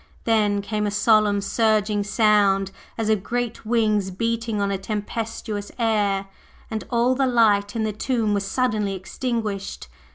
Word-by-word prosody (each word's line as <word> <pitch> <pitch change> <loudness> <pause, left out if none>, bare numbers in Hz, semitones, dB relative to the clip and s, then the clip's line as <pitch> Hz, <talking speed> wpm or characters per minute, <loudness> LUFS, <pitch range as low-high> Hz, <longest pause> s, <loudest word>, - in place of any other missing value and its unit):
Then 210 -3 +2
came 210 0 -1
a - - +1
solemn 210 0 +3
surging 210 0 +1
sound 205 -2 +3 0.3
as 225 -2 -1
of 215 -3 +2
great 240 0 -3
wings 215 -4 +2
beating 230 +2 -2
on 200 0 0
a 195 - 0
tempestuous 210 0 -4
air, 205 -4 +1 0.5
and 220 -1 -3
all 240 +1 +2
the 265 0 +1
light 210 -4 +3
in 225 - 0
the 215 -1 -1
tomb 220 -1 0
was 200 -1 0
suddenly 210 -2 0
extinguished. 205 - -4
215 Hz, 150 wpm, -23 LUFS, 200-230 Hz, 0.5 s, solemn